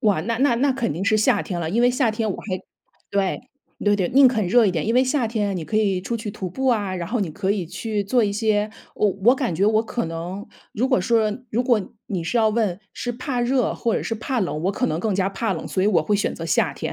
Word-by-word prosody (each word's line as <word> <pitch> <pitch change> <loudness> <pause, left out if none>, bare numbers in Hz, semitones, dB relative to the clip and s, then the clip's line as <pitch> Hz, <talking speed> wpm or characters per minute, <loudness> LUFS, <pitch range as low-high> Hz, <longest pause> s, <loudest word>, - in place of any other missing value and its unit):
哇， 205 - +2
那 230 +3 -2
那 270 -2 +3
那 270 +2 +2
肯 245 - -1
定 170 +6 -3
是 215 +1 +3
夏 215 - +3
天 180 - -4
了， 160 - -2
因 230 +6 +2
为 245 - +5
夏 250 -2 +1
天 220 0 -2
我 - - -3
还 185 -3 -4 0.5
对， 195 -2 0 0.4
对 205 0 +4
对， 185 -3 0
宁 270 0 +7
肯 220 -6 0
热 230 +5 +5
一 - - +3
点。 170 +1 -2
因 230 - +1
为 255 - +5
夏 260 -1 +1
天 220 -2 -1
啊， - - -1
你 180 -4 -4
可 215 - -2
以 200 -4 +2
出 230 +5 -3
去 220 -2 -5
徒 190 -3 -5
步 265 +9 -3
啊， 205 -6 +1
然 175 -2 -4
后 240 +2 -1
你 185 -5 -1
可 195 +4 -2
以 200 -4 -1
去 205 +4 -3
做 240 +4 +2
一 205 - +1
些 210 0 +1 0.2
我 210 - +2 0.2
我 245 +3 +7
感 255 - -2
觉 185 +5 +1
我 215 +1 +3
可 235 +1 -3
能 170 +5 -6 0.3
如 250 +5 0
果 260 -7 +3
说 220 +2 +2 0.2
如 240 +3 +1
果 235 -6 +1
你 185 -5 -3
是 205 +9 -2
要 220 -1 +4
问： 210 -5 0
“是 245 - -4
怕 250 +1 -3
热 250 0 +1
或 230 - -1
者 - - -1
是 225 - -2
怕 245 +3 -2
冷？” 170 -5 -2
我 195 - +1
可 - - 0
能 155 +1 -1
更 215 0 0
加 190 0 +1
怕 200 +2 -2
冷， 165 - -5
所 185 - -1
以 200 - +3
我 175 -7 +3
会 210 - 0
选 200 0 0
择 165 - -6
夏 155 - +2
天。 - - -5
210 Hz, 300 characters per minute, -22 LUFS, 190-235 Hz, 0.5 s, 宁